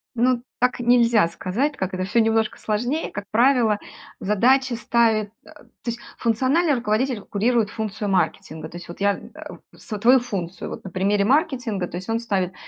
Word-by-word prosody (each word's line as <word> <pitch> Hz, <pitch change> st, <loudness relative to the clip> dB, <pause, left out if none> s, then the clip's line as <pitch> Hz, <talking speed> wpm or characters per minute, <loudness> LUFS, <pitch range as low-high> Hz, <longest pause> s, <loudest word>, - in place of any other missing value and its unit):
Ну, 245 Hz, +1 st, +2 dB, 0.2 s
так 250 Hz, 0 st, +1 dB
нельзя 235 Hz, -5 st, +4 dB
сказать, 190 Hz, -, -2 dB
так -, -, -17 dB
как 190 Hz, 0 st, -2 dB
это 185 Hz, -, -2 dB
всё 195 Hz, +5 st, +1 dB
немножко 225 Hz, -1 st, +1 dB
сложнее. 245 Hz, +9 st, -2 dB
Как 205 Hz, -, -6 dB
правило, 235 Hz, -2 st, +3 dB, 0.4 s
задачи 250 Hz, +6 st, +2 dB
ставит, 225 Hz, -2 st, +1 dB, 0.2 s
э, -, -, -16 dB
то -, -, -18 dB, 0.3 s
есть, 235 Hz, 0 st, -3 dB, 0.2 s
функциональный 265 Hz, +8 st, +2 dB
руководитель 235 Hz, 0 st, 0 dB
курирует 220 Hz, +2 st, 0 dB
функцию 215 Hz, -1 st, -4 dB
маркетинга. 175 Hz, -4 st, -1 dB
То 175 Hz, -, -9 dB
есть, 175 Hz, -, -10 dB
вот 170 Hz, -, -9 dB
я, 200 Hz, 0 st, +2 dB, 0.2 s
а, -, -, -9 dB, 0.2 s
свою 230 Hz, +5 st, +3 dB
функцию, 190 Hz, -7 st, -5 dB
вот, -, -, -7 dB
на 190 Hz, -, -7 dB
примере 200 Hz, +3 st, +1 dB
маркетинга, 245 Hz, -, +1 dB
то -, -, -9 dB
есть, 185 Hz, +4 st, -8 dB
он 225 Hz, 0 st, +1 dB
ставит 190 Hz, -5 st, -1 dB
225 Hz, 175 wpm, -23 LUFS, 200-245 Hz, 0.4 s, нельзя